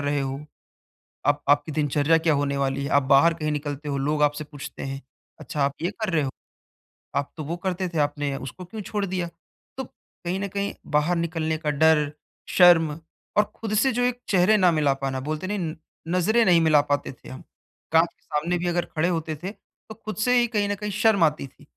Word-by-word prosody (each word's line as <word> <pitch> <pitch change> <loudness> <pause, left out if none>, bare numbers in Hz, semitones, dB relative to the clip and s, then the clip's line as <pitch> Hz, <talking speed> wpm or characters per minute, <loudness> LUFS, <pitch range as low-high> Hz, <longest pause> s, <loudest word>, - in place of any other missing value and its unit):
रहे 145 0 0
हो? 135 0 -3 0.9
आप 145 0 +2
आपकी 145 +2 +3
दिनचर्या 150 +2 +2
क्या 160 -1 +2
होने 140 0 0
वाली 140 0 -1
है, - - -2
आप 140 - +4
बाहर 140 +5 +5
कहीं 155 -2 -2
निकलते 145 0 -4
हो, 140 -1 -1
लोग 150 +2 0
आपसे 150 +1 +1
पूछते 145 -1 -9
हैं, 135 0 -4 0.4
अच्छा 150 - -5
आप 140 0 0
ये 175 - 0
कर 215 -3 -1
रहे 155 - +2
हो? 135 - -2 0.9
आप 140 0 -1
तो 155 - -4
वो 165 +4 -3
करते 185 0 -1
थे, 170 - -5
आपने 145 -1 0
उसको 135 +8 -8
क्यों 215 +4 -7
छोड़ 205 0 -2
दिया? 180 -2 -3 0.5
तो, 265 - -2
कहीं 180 -4 -7
न 200 - -2
कहीं 200 +1 -3 0.2
बाहर 160 +4 +1
निकलने 160 -1 -1
का 155 -1 -2
डर, 150 0 +3 0.4
शर्म 165 -4 +5 0.4
और 210 - +7
खुद 220 -2 -4
से 265 +5 +3
जो 245 +1 0
एक 245 0 0
चेहरे 195 +3 +4
ना 185 -3 +5
मिला 150 -4 +2
पाना, 135 -1 -3
बोलते 155 +6 -4
नहीं 205 +1 -2
न 160 -3 -3 0.3
नज़रें 185 +7 +3
नहीं 175 -4 +5
मिला 155 -2 +5
पाते 145 0 0
थे 125 - -14
हम, 130 - -9 0.5
काँच 165 +1 +5
के - - -42
सामने 170 +4 -1
भी 175 +1 -2
अगर 175 0 0
खड़े 160 +2 +2
होते 160 -2 -2
थे 190 - -3 0.4
तो 220 - -8
खुद 215 - -4
से 245 +4 +2
ही 240 - +3
कहीं 210 -3 0
न 205 - 0
कहीं 210 +1 -4
शर्म 205 -2 +3
आती 150 -3 +1
थी। 140 - -21
160 Hz, 220 wpm, -25 LUFS, 145-185 Hz, 0.9 s, और